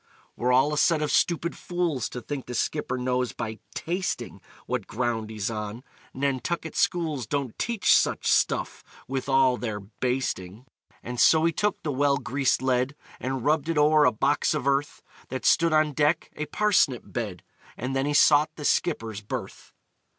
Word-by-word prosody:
"We're 125 Hz, +1 st, 0 dB
all 135 Hz, +4 st, +4 dB
a 150 Hz, -, 0 dB
set 160 Hz, -3 st, +3 dB
of 150 Hz, -, -1 dB
stupid 170 Hz, 0 st, +1 dB
fools 175 Hz, -8 st, -2 dB
To 125 Hz, -, -6 dB
think 135 Hz, +3 st, -6 dB
the 125 Hz, -, -5 dB
skipper 130 Hz, +1 st, -1 dB
knows 125 Hz, 0 st, -1 dB
by 110 Hz, -2 st, -5 dB, 0.2 s
tasting 180 Hz, +2 st, -3 dB, 0.2 s
What -, -, -3 dB
ground 115 Hz, -2 st, -2 dB
he's 110 Hz, -1 st, -3 dB
on 105 Hz, +2 st, -5 dB, 0.3 s
Nantucket 140 Hz, +5 st, -2 dB
schools 155 Hz, -9 st, 0 dB
Don't 140 Hz, -3 st, -2 dB
teach 235 Hz, -3 st, +3 dB
such -, -, +1 dB
stuff, -, -, +1 dB, 0.2 s
with 135 Hz, +1 st, -3 dB
all 135 Hz, -2 st, +4 dB
their 110 Hz, -4 st, -4 dB
basting!" 110 Hz, -1 st, -3 dB, 0.4 s
And 125 Hz, 0 st, -5 dB
so 160 Hz, +4 st, +5 dB
he 165 Hz, -, +3 dB
took 210 Hz, +6 st, -1 dB
the 150 Hz, -, -1 dB
well 140 Hz, +1 st, +2 dB
greased 135 Hz, 0 st, 0 dB
lead 130 Hz, +2 st, +1 dB, 0.2 s
And 130 Hz, 0 st, -3 dB
rubbed 155 Hz, +1 st, +1 dB
it 165 Hz, -, 0 dB
o'er 150 Hz, 0 st, +5 dB
a 125 Hz, -, +5 dB
box 140 Hz, +7 st, +1 dB
of 150 Hz, -, -3 dB
earth 140 Hz, +1 st, 0 dB, 0.3 s
That 130 Hz, -3 st, -5 dB
stood 165 Hz, 0 st, +4 dB
on 155 Hz, -1 st, +3 dB
deck 150 Hz, +4 st, +1 dB
a 150 Hz, -, -4 dB
parsnip 165 Hz, -, +2 dB
bed 105 Hz, -7 st, -5 dB, 0.3 s
And 130 Hz, +3 st, -3 dB
then 135 Hz, +1 st, 0 dB
he 145 Hz, -, 0 dB
sought 150 Hz, +1 st, +5 dB
the 150 Hz, -, -7 dB
skipper's 115 Hz, -, 0 dB
berth. 105 Hz, -, -7 dB
135 Hz, 170 wpm, -26 LUFS, 125-150 Hz, 0.4 s, so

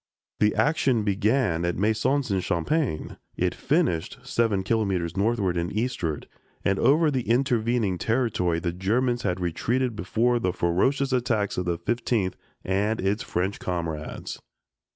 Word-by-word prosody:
The 105 Hz, 0 st, +3 dB
action 135 Hz, -7 st, +2 dB
began 105 Hz, -3 st, +1 dB
at 85 Hz, 0 st, -1 dB
Maisons 110 Hz, +6 st, +1 dB
en 95 Hz, -, +2 dB
Champagne; 95 Hz, -, -1 dB, 0.2 s
it -, -, +1 dB
finished 85 Hz, +6 st, 0 dB
seven 115 Hz, -6 st, +1 dB
kilometers 95 Hz, -5 st, 0 dB
northward 100 Hz, -3 st, +1 dB
and 85 Hz, +1 st, -1 dB
eastward, 105 Hz, -, -2 dB, 0.4 s
and 95 Hz, 0 st, +2 dB
over 155 Hz, +2 st, +4 dB
the 130 Hz, -4 st, -2 dB
intervening 120 Hz, -6 st, +1 dB
territory 110 Hz, -8 st, +1 dB
the 85 Hz, 0 st, -2 dB
Germans 120 Hz, +7 st, 0 dB
had 90 Hz, -, -1 dB
retreated 115 Hz, +8 st, -1 dB
before 115 Hz, +7 st, +1 dB
the 90 Hz, -5 st, 0 dB
ferocious 130 Hz, +11 st, +1 dB
attacks 115 Hz, -5 st, 0 dB
of 90 Hz, -, -2 dB
the 85 Hz, -1 st, 0 dB
Fifteenth 110 Hz, 0 st, -1 dB, 0.3 s
and 105 Hz, +4 st, 0 dB
its 100 Hz, +3 st, 0 dB
French 95 Hz, +3 st, -2 dB
comrades. 85 Hz, -4 st, -4 dB
105 Hz, 135 wpm, -26 LUFS, 90-120 Hz, 0.4 s, over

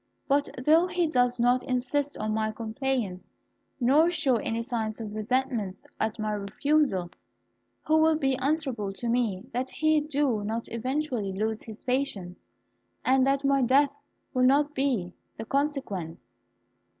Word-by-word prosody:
But 285 Hz, +1 st, +2 dB, 0.2 s
though 325 Hz, +4 st, +5 dB
he 360 Hz, -1 st, 0 dB
does 250 Hz, -5 st, +1 dB
not 245 Hz, +1 st, +3 dB
insist 265 Hz, +3 st, -1 dB
on 215 Hz, 0 st, -2 dB
my 215 Hz, 0 st, 0 dB
compliance, 225 Hz, -3 st, -3 dB, 0.5 s
nor 285 Hz, +7 st, +4 dB
show 310 Hz, -8 st, +2 dB
any 230 Hz, +1 st, -2 dB
signs 225 Hz, -3 st, -3 dB
of 215 Hz, -2 st, -6 dB
resentment 220 Hz, -3 st, -1 dB, 0.2 s
at 220 Hz, +1 st, -1 dB
my 215 Hz, -1 st, -2 dB
refusal, 205 Hz, -, 0 dB, 0.7 s
who 315 Hz, 0 st, +3 dB
will 320 Hz, 0 st, +4 dB
be 270 Hz, -3 st, +1 dB
answerable 265 Hz, -7 st, -1 dB
to 235 Hz, -, -4 dB
me 230 Hz, -5 st, 0 dB
that 255 Hz, +2 st, -1 dB
he 310 Hz, 0 st, +2 dB
do 285 Hz, -7 st, 0 dB
not 225 Hz, +2 st, -3 dB
eventually 250 Hz, -3 st, -2 dB
lose 215 Hz, +3 st, -2 dB
his 220 Hz, -1 st, -11 dB
patience, 250 Hz, -9 st, -2 dB, 0.6 s
and 260 Hz, 0 st, +4 dB
that 275 Hz, 0 st, +1 dB
my 275 Hz, 0 st, +3 dB
death 270 Hz, +3 st, +4 dB, 0.4 s
will 255 Hz, -, +1 dB
not 290 Hz, +2 st, +3 dB
be 245 Hz, -11 st, 0 dB, 0.2 s
the 225 Hz, -, -5 dB
consequence?" 240 Hz, -, -2 dB
250 Hz, 145 wpm, -27 LUFS, 215-280 Hz, 0.7 s, though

